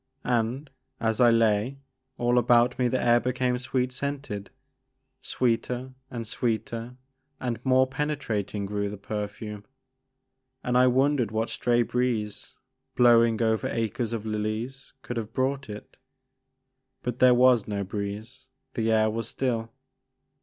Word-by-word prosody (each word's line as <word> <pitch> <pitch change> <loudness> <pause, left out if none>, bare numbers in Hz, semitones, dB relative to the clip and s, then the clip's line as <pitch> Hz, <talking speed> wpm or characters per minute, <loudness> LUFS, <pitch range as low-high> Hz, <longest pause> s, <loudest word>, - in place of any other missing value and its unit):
And, 125 +4 -1 0.3
as 110 +1 0
I 120 - +7
lay, 115 +2 +2 0.4
all 120 0 +3
about 120 +1 +3
me 125 - +3
the 130 +1 0
air 120 0 +4
became 125 0 0
sweet 130 0 -1
scented. 135 -6 -4 0.7
Sweeter 125 +1 -1 0.2
and 120 -3 -5
sweeter 115 +1 -2 0.4
and 120 -2 -3
more 130 0 +4
penetrating 130 -8 -2
grew 100 0 -2
the 105 - -7
perfume, 105 0 -5 1.0
and 125 - -1
I 125 +1 +6
wondered 130 -2 +2
what 110 +1 -1
stray 120 -1 +2
breeze, 120 -4 -2 0.4
blowing 115 -2 +5
over 110 -1 +1
acres 115 +1 -2
of 110 -2 -4
lilies 110 +5 -3
could 120 - -5
have 115 -1 -4
brought 135 +1 -1
it. 105 0 -9 1.1
But 125 0 -3
there 125 -1 +7
was 125 -3 +5
no 100 -1 -2
breeze; 105 +6 -6 0.3
the 115 -1 0
air 110 0 +4
was 115 0 -2
still. 115 -4 -1
120 Hz, 130 wpm, -27 LUFS, 110-125 Hz, 1.1 s, I